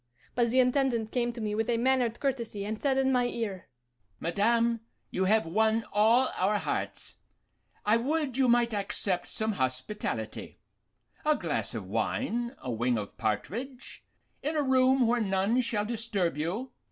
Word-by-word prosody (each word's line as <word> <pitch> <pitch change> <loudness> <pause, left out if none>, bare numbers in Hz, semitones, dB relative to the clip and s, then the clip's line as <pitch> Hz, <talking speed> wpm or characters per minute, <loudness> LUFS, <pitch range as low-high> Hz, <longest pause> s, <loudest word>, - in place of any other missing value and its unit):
But 240 -1 +2
the 255 +3 +3
Intendant 250 -3 +2
came 240 -1 0
to 235 - -9
me 210 -1 -1
with 220 +1 -1
a 235 - +2
mannered 245 -1 +2
courtesy, 235 -7 -2
and 215 +1 -4
said 270 -2 +2
in 265 0 +3
my 250 -1 +3
ear, 210 -6 -4 0.5
'Madame, 230 +6 +2 0.3
you 190 - 0
have 215 0 +3
won 220 +6 +2
all 230 +5 +4
our 205 +3 +2
hearts; - - -3 0.7
I 215 +2 +5
would 285 +2 -1
you 265 -1 +3
might 235 -1 +3
accept 195 -3 -1
some 220 0 -1
hospitality 130 +4 -3 0.7
a 305 0 +3
glass - - -2
of - - -4
wine, 240 -1 -1
a 125 - -5
wing 120 +1 +1
of 105 -2 -5
partridge, 225 - -4 0.4
in 305 +3 -2
a 300 - +2
room 260 -1 +4
where 235 +1 +2
none 200 +4 +2
shall 230 -3 -1
disturb 215 - -1
you? 185 - -3
230 Hz, 160 wpm, -29 LUFS, 205-250 Hz, 0.7 s, I